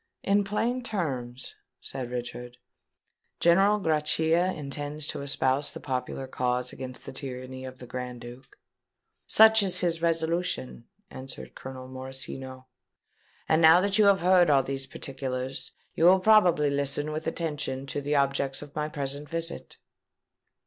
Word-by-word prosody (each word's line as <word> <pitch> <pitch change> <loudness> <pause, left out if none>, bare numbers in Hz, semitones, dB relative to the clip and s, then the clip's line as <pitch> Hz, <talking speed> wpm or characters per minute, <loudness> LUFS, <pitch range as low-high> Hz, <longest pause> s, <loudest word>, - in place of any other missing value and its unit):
"In 200 +1 +3
plain 230 +5 -1
terms," 135 - -4 0.3
said 125 -2 -5
Richard, 120 0 -6 0.8
"General 195 +5 +4
Grachia 160 +2 +2
intends 145 0 -5
to - - -4
espouse 140 0 0
the - - -8
popular 130 0 -4
cause 125 -1 -2
against 130 -1 -8
the - - -7
tyranny 130 -1 -6
of 130 0 -9
the 125 - -10
Grand 125 -1 -6
Duke?" 125 +2 -12 0.7
"Such 220 0 +7
is 190 -3 +3
his 170 -2 0
resolution," 165 -6 -1 0.3
answered 130 0 -8
Colonel 130 -1 -9
Morosino. 130 0 -7 0.8
"And 160 +1 +3
now 160 +2 +8
that 200 +2 +1
you 210 - +6
have 200 -1 +5
heard 180 -1 +5
all 140 -2 +4
these 135 0 -4
particulars, 130 0 -5 0.2
you 165 - +1
will 185 +2 +7
probably 180 -8 +4
listen 140 +2 -1
with 155 +1 -4
attention 150 -5 -3
to 145 +1 -4
the 145 +1 -1
objects 140 0 0
of 145 -1 -13
my 150 0 -2
present 140 0 -3
visit." 165 +1 -4
140 Hz, 140 wpm, -27 LUFS, 130-170 Hz, 0.8 s, now